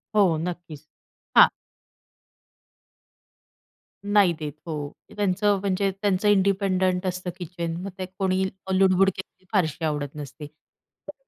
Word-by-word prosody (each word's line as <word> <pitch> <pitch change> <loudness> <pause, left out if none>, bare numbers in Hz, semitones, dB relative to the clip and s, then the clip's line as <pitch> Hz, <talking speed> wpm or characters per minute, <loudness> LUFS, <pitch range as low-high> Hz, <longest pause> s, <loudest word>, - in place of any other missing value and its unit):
हो, 185 -6 +4
नक्कीच. 160 -4 -7 0.5
हां. - - +10 2.5
नाही 205 -3 +4
देत, 150 -2 -4
हो. 150 -3 -4 0.2
ते - - -15
त्यांचं 205 0 +1
म्हणजे 195 0 0
त्यांचं 205 0 +1
इंडिपेंडंट 190 -2 +2
असतं 180 0 -3
किचन, 170 -2 -4
मग 195 - -5
ते 185 - -2
कोणी 190 -1 +1 0.3
लुडबुड 190 0 +4
केलेली 190 0 -11
फारशी 165 -4 +1
आवडत 145 -2 -2
नसते. 150 +1 -8
तर 150 +1 -18
185 Hz, 115 wpm, -25 LUFS, 160-195 Hz, 2.5 s, हां